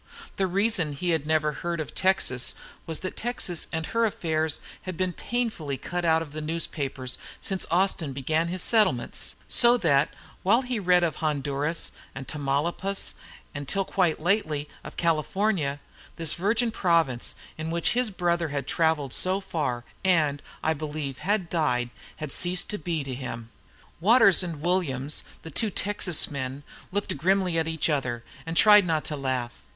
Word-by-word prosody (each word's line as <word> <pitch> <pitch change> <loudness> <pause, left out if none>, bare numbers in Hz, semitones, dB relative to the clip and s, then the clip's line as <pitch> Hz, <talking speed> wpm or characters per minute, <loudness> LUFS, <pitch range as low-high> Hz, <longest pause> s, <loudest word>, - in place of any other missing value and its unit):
The 190 - +2
reason 190 -4 +1
he 175 +5 -1
had 155 -3 0
never 155 -1 +2
heard 170 +2 -3
of 155 - -5
Texas 185 -9 +1 0.3
was 160 -1 -3
that 185 - -4
Texas 220 -8 -1
and 160 0 -2
her 230 +6 0
affairs 160 -7 0 0.2
had 185 -3 -6
been 185 -1 0
painfully 215 - -2
cut 175 +5 -4
out 160 -1 +3
of 150 -3 -12
his 155 - -4
newspapers 140 -5 -3 0.2
since 190 -1 -2
Austin 175 -3 +1
began 155 +5 0
his 180 +1 0
settlements; 205 - +2
so 240 0 +5
that, 145 - +3 0.3
while 230 +7 +4
he 250 -3 -2
read 180 -2 +4
of 165 - 0
Honduras 145 +1 -1 0.2
and 135 -1 -7
Tamaulipas, 155 +7 0 0.4
and, 145 -1 -6
till 195 +5 0
quite 180 -4 +1
lately, 155 -5 +1 0.2
of - - -10
California, 165 -2 +1 0.4
this 165 -2 +2
virgin 225 +6 +1
province, 165 - +1 0.2
in 160 +1 -4
which 170 +1 +1
his 245 -1 +1
brother 175 -3 0
had 140 -2 -3
travelled 160 -5 +1
so 185 +1 +2
far, 145 -10 -2 0.2
and, 155 -6 +2 0.2
I 160 - +2
believe, 150 -3 -4
had 200 -2 0
died, 125 -8 0 0.2
had 155 -3 -6
ceased 180 +5 +1
to 210 - -3
be 160 -2 -2
to 135 -1 -5
him. 115 -3 -6 0.5
Waters 200 +1 +6
and 165 -5 -4
Williams, 150 -6 0 0.2
the 160 - -8
two 220 +9 +1
Texas 190 -5 +2
men, 135 0 -4 0.3
looked 205 +2 -1
grimly 180 +1 +2
at 160 - 0
each 160 -2 0
other 130 -6 -1 0.2
and 165 0 -3
tried 210 -3 +7
not 160 -2 +1
to 150 - -2
laugh. 130 -3 -2
165 Hz, 165 wpm, -26 LUFS, 145-185 Hz, 0.5 s, tried